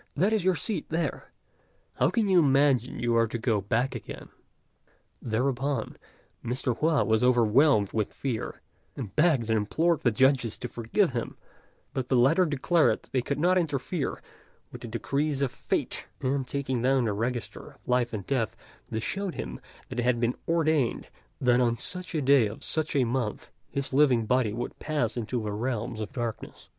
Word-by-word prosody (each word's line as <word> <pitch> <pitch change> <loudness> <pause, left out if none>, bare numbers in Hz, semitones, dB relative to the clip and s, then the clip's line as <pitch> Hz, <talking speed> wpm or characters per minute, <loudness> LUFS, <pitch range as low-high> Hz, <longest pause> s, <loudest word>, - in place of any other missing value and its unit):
that 195 +8 +2
is 215 -4 +1
your 185 0 +3
seat 215 +4 -3
there; 165 +1 -3 0.7
how - - +3
can 225 -3 +1
you 185 -2 +5
imagine 135 -4 +3
you 120 -1 0
are 115 0 +4
to 115 - -4
go 110 -3 0
back 115 +6 0
again?" - - -8 0.9
Thereupon 125 +2 -1 0.5
Mr. 125 0 -1
Hua 155 -1 +3
was 110 +1 +2
overwhelmed 120 -2 +4
with 110 -2 -1
fear, 125 -5 -4 0.3
and 110 -8 -7
begged 150 -8 +3
and 110 - +3
implored 160 +10 +1
the 120 - +3
judges 125 0 +2
to 125 - -5
forgive 120 - 0
him; 120 -2 -4 0.6
but 130 -2 -3
the 130 - +3
latter 150 +9 +4
declared 155 +3 +2
they 130 - +1
could 140 +3 -3
not 180 +4 +3
interfere 150 0 -2 0.5
with - - -9
the - - -6
decrees 140 +5 -1
of 130 - 0
fate, - - -2
and 135 0 -1
taking 130 -3 -2
down 130 0 +2
the 105 - 0
register 120 +3 -4
of - - -28
Life 125 -1 +1
and 105 -5 -5
Death 115 -4 -1 0.3
they 110 - -2
showed 195 - -3
him 60 0 -5 0.3
that 125 - -4
it - - +1
had 120 -1 +2
been 120 +1 +1
ordained 155 -6 +1 0.3
that 125 -1 +3
on 120 -1 +2
such 180 +4 -3
a 150 - 0
day 135 -4 +5
of 105 - -8
such 155 0 0
a 135 - +4
month 120 -3 -2 0.2
his 140 -1 -2
living 130 -5 +4
body 125 -1 +2
would 120 +3 -5
pass 145 -8 -1
into 120 0 -2
the 105 - -3
realms 115 +1 -3
of 110 - -5
darkness. 120 -3 -6
125 Hz, 180 wpm, -27 LUFS, 115-145 Hz, 0.9 s, you